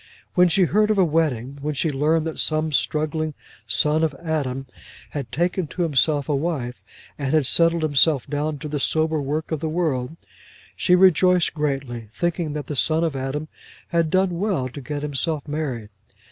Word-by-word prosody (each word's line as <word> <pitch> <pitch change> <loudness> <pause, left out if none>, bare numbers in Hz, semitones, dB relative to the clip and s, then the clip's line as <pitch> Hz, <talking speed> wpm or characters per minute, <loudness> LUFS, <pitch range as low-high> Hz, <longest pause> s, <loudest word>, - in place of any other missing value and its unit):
When 180 0 +5
she 185 +3 +3
heard 210 +5 +2
of 215 - +2
a 190 - +5
wedding, 140 -5 -1
when 150 +1 -2
she 155 +3 0
learned 155 +3 +1
that 160 - -4
some 155 0 +1
struggling 155 +1 0 0.3
son 150 +2 +2
of 155 -3 0
Adam 135 -4 -3 0.5
had 135 -6 -5
taken 175 +2 0
to 175 - -3
himself 145 -2 +2
a 150 - 0
wife, 135 -5 -3 0.4
and 140 +1 0
had 155 -3 +3
settled 165 +4 +3
himself 145 -2 +3
down 150 +1 -2
to 145 - -7
the 150 0 -3
sober 155 +2 +1
work 150 +4 -3
of 160 - -1
the 160 +1 -2
world, 155 -5 -1 0.6
she 180 - +3
rejoiced 180 -1 +4
greatly, 135 -6 -3
thinking 170 -1 -1
that 150 -1 -4
the 150 - -5
son 160 +4 +2
of 160 -4 -1
Adam 135 +3 -3 0.4
had 170 -2 +1
done 185 -1 +1
well 185 -11 0
to 140 +3 -9
get 145 +2 -5
himself 150 +1 -1
married. 140 -8 -3
155 Hz, 180 wpm, -23 LUFS, 140-165 Hz, 0.6 s, When